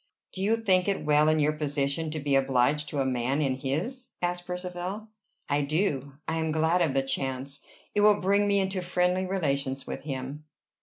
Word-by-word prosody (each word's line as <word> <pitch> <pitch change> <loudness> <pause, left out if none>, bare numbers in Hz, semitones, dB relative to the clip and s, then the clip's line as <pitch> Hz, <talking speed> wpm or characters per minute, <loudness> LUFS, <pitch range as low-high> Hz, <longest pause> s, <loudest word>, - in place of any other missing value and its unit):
"Do 190 - -5
you 215 +4 +2
think 190 -5 +2
it 200 -5 -1
well 150 +1 +4
in 155 - +3
your 150 0 +3
position 150 +1 -1
to 155 0 -3
be 145 -1 -1
obliged 135 +2 +2
to 145 - -1
a - - 0
man 130 +2 0
in 135 -4 0
his?" 175 - -3
asked 175 0 -2
Percivale. 180 +3 -5 0.4
"I 145 +1 +1
do. 145 -2 0
I 160 - -1
am 160 -1 0
glad 160 +3 +2
of 160 -6 +1
the 135 - +3
chance. 135 +1 -3 0.3
It 205 - +2
will 210 0 +5
bring 200 +2 +2
me 200 0 +3
into 190 -1 -1
friendly 180 +1 +1
relations 140 -7 -1
with - - -5
him." 140 +1 -5
155 Hz, 195 wpm, -28 LUFS, 140-185 Hz, 0.4 s, will